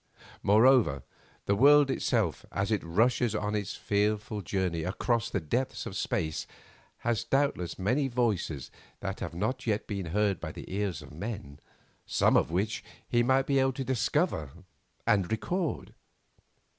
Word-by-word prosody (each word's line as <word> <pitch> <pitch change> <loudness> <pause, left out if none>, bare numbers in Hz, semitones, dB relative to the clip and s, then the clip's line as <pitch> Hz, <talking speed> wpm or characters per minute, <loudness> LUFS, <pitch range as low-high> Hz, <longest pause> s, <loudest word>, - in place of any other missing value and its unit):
Moreover, 110 - +4 0.4
the 100 - +2
world 140 +4 +6
itself 110 - 0
as 100 +2 -1
it 105 - +1
rushes 110 +6 +2
on 105 0 -1
its 100 -1 -2
fearful 105 +1 0
journey 90 -3 -1
across 115 +6 0
the 100 - -1
depths 120 - -2
of - - -6
space 80 -2 -2 0.5
has 120 -3 0
doubtless 135 -11 0
many 125 +9 +1
voices 110 - -1 0.3
that - - -4
have - - -5
not 120 +7 -2
yet 105 -1 0
been 100 -4 -4
heard 100 +1 +1
by 80 -1 -6
the - - -8
ears 100 -6 -2
of - - -13
men, 80 -6 -6 0.5
some - - +3
of - - +3
which 100 +7 -1 0.2
he 120 - +2
might 130 +2 +3
be 140 -1 +2
able 135 0 +2
to 135 - -3
discover 130 - 0 0.6
and 105 -5 +2
record. 170 - -2
105 Hz, 150 wpm, -29 LUFS, 95-125 Hz, 0.6 s, world